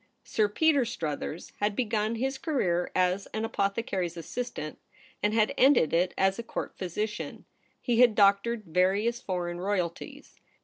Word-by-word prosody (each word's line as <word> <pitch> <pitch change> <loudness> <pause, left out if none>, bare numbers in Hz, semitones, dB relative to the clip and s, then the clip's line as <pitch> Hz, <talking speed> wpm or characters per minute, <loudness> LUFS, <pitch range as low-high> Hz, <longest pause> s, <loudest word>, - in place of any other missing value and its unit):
Sir 215 -2 +1
Peter 290 +4 +3
Struthers 160 -7 -4
had 205 0 0
begun 220 -1 0
his 265 +3 -2
career 180 - 0
as 185 +1 +1
an 220 +1 -1
apothecary's 195 -5 -1
assistant, 170 -3 -5 0.4
and 210 - +2
had 215 -1 +2
ended 255 - +5
it 175 +2 +2
as 190 +2 +2
a - - -3
Court - - -5
physician. 210 +4 -4 0.3
He 240 -2 0
had 240 -3 +6
doctored 205 +3 +3
various 190 +7 +1
foreign 175 -2 -3
royalties. 180 -3 -4
205 Hz, 140 wpm, -28 LUFS, 180-230 Hz, 0.4 s, had